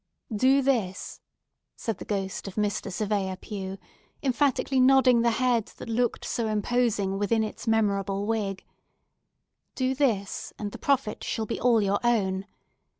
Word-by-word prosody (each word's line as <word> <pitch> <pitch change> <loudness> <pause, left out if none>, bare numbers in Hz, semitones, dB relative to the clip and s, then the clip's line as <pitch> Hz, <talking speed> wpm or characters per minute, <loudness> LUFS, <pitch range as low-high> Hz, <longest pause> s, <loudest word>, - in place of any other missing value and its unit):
"Do 265 +5 +4
this," 220 -9 -1 0.5
said 225 - -4
the - - -7
ghost 195 -1 -3
of 195 - -7
Mr. 210 -1 -1
Surveyor 200 -2 -1
Pue, 195 -1 -6 0.5
emphatically 270 0 +1
nodding 255 -2 +6
the 235 - +3
head 235 -1 +1
that - - -8
looked 240 +1 0
so 230 -2 -1
imposing 215 -2 0
within 220 +2 +2
its 215 +2 -6
memorable 200 -3 +1
wig; 210 -3 -2 1.1
"do 260 0 +1
this, 230 -8 -1
and 205 -1 -4
the - - -9
profit 270 -6 0
shall 220 - -2
be - - -3
all 235 -3 +4
your 200 0 +1
own. 195 -5 +1
220 Hz, 145 wpm, -27 LUFS, 200-245 Hz, 1.1 s, nodding